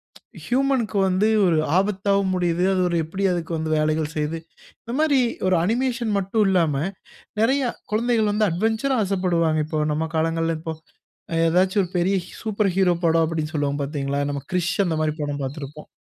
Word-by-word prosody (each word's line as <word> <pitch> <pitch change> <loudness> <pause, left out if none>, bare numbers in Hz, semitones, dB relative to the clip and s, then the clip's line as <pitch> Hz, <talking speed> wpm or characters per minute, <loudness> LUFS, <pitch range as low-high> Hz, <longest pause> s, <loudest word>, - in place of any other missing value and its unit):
ப்ச் - - -16
ஹியூமன் 265 0 +1
க்கு 200 - -3
வந்து 190 +3 +2 0.2
ஒரு 165 -3 +3 0.2
ஆபத்தாவும் 195 -1 +1
முடியுது. 175 0 0
அது 185 - +1
ஒரு 170 - 0
எப்படி 190 +5 -5
அதுக்கு 170 -1 -3
வந்து 155 0 -3
வேலைகள் 155 0 0
செய்யுது. 155 +2 -2 0.4
இந்த 235 - -6
மாரி 300 -4 +3 0.3
ஒரு 185 -2 +3
அனிமேஷன் 235 +2 0
மட்டும் 200 +2 +1
இல்லாம, 165 -6 +2 0.7
நிறைய 270 +4 +2 0.3
குழந்தைகள் 225 -1 +2
வந்து 210 0 +2
அட்வென்ச்சரா, 220 +9 0
ஆசைப்படுவாங்க. 170 -5 +1
இப்போ 155 -1 -2
நம்ம 160 +2 -1
காலங்கள்ல 165 0 0
இப்போ 160 0 -5 0.7
ஏதாச்சும் 185 +4 +3
ஒரு 180 - -6
பெரிய 185 +3 +2 0.3
சூப்பர் 210 -3 0
ஹீரோ 190 -2 +3
படம் 165 0 +4
அப்படின்னு 155 -1 -3
சொல்லுவோம் 145 0 -1
பாத்தீங்களா? 140 -1 -2
நம்ம 140 -1 -4
கிரிஷ் 175 -2 0
அந்த 160 - -1
மாரி 155 -1 0
படம் 145 -1 -3
பாத்திருப்போம். 145 +2 -7
175 Hz, 165 wpm, -23 LUFS, 160-210 Hz, 0.7 s, படம்